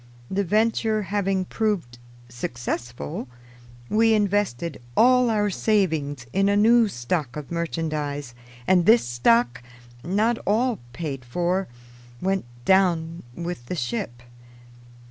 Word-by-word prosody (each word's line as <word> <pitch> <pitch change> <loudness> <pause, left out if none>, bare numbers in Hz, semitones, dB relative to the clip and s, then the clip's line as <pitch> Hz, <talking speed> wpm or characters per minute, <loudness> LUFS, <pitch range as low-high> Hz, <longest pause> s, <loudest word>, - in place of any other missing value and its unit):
The 200 +1 +1
venture 215 +2 +1
having 195 0 0
proved 180 - -2 0.3
successful, 120 - -5 0.6
we 225 - +4
invested 200 - 0 0.2
all 250 0 +5
our 210 -2 +1
savings 160 - 0
in 195 +1 +3
a 200 - +3
new 230 +2 +5
stock 135 -3 -3
of 150 -1 -7
merchandise, 155 -5 -3 0.3
and 180 +1 +3
this 230 +2 +6
stock, 120 +1 +2 0.4
not 215 +6 +1
all 230 +2 +2
paid 135 -2 -5
for, 175 +9 -1 0.5
went 190 -3 -1 0.2
down 170 -3 +2
with 170 -8 -5
the 180 - -3
ship. 120 -3 -4
180 Hz, 110 wpm, -24 LUFS, 135-205 Hz, 0.6 s, this